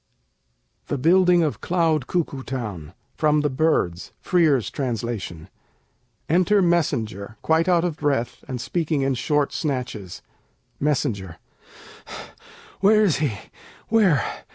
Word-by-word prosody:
THE 145 - -2
BUILDING 180 +4 +4
OF 150 - -2
CLOUD 165 -6 +1
CUCKOO 155 -6 -2
TOWN 105 - -6 0.2
From 150 -1 +2
'The 150 -1 0
Birds 130 - 0
': - - -46
Frere's 155 - +3
Translation 115 - -4 0.8
[Enter 185 +5 +3
Messenger, 115 - -1
quite 160 +2 +2
out 175 -2 +3
of 165 -3 -3
breath, 140 -5 -1
and 130 -2 -4
speaking 155 +1 -1
in 135 0 +1
short 145 +3 0
snatches.] 125 - -4 0.6
Messenger 115 - -1 1.4
Where 215 +2 +5
is 185 -8 +2
he? 145 -6 0 0.6
Where? 205 -9 +3
145 Hz, 115 wpm, -23 LUFS, 120-170 Hz, 1.4 s, Where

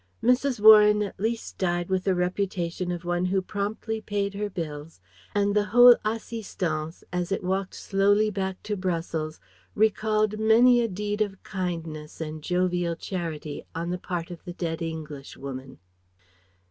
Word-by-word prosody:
Mrs. 250 0 +2
Warren 210 0 +8
at 200 - -7
least 225 +2 -3
died 175 -1 0
with 190 -1 0
the 190 - +2
reputation 180 -1 -1
of 175 0 -5
one 175 +1 0
who 190 +1 +1
promptly 210 +3 -3
paid 200 -1 -2
her 205 +1 -3
bills; 160 -4 -6 0.4
and 205 0 +2
the 205 0 +3
whole 245 +4 +8
assistance, 195 -8 -3
as 180 +1 -2
it 195 - -1
walked 190 +1 -2
slowly 205 +2 +2
back 190 -1 -3
to 210 - -2
Brussels, 165 -4 -3 0.4
recalled 215 0 +2
many 240 +3 +6
a 230 - +1
deed 210 +1 -3
of 195 -2 -2
kindness 165 -6 -5
and 155 -1 -5
jovial 180 0 0
charity 165 -5 -5
on 170 +1 -2
the 180 - -3
part 175 -1 -4
of 175 - -9
the 175 - -7
dead 170 -1 -3
Englishwoman. 140 -4 -7
185 Hz, 150 wpm, -26 LUFS, 170-210 Hz, 0.4 s, Warren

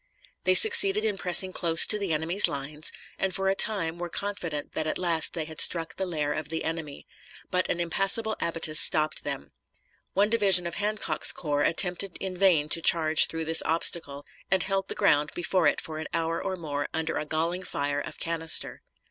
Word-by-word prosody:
They 185 0 +3
succeeded 210 +1 +6
in 205 -3 -2
pressing 185 +1 +3
close 165 -3 +1
to 210 - +1
the 195 -4 -4
enemy's 160 +6 +3
lines, 145 +2 -5 0.3
and 190 -1 -2
for 195 0 0
a - - +2
time 180 -5 +2
were 175 0 -5
confident 175 -7 -5
that 155 - -3
at - - -2
last 170 -3 +1
they 160 -2 -4
had 160 0 -4
struck 165 -2 -1
the 190 - -4
lair 150 -4 -2
of 155 -1 -6
the 160 0 -3
enemy, 160 -3 -6 0.5
but 180 0 -1
an 175 - -2
impassable 195 +6 0
abatis 165 -2 +1
stopped 155 0 +1
them. 70 0 -5 0.6
One 205 +2 +1
division 195 -6 +4
of 170 - -5
Hancock's 210 +3 0
corps 145 -3 -3
attempted 180 +3 +2
in 190 -1 -6
vain 175 -6 +2
to 165 - +2
charge 160 -1 +5
through 165 0 -6
this 160 +1 +2
obstacle, 155 -3 +1 0.2
and 190 -2 +2
held 195 0 -3
the - - -6
ground 145 +1 +1
before 180 +1 0
it - - +1
for 155 -2 -7
an 155 - -6
hour 165 0 -2
or 190 -1 -4
more 145 -5 -5
under 160 0 -3
a - - -4
galling 165 +4 -2
fire 145 -5 -4
of - - -9
canister. 165 -1 0
165 Hz, 195 wpm, -26 LUFS, 155-190 Hz, 0.6 s, succeeded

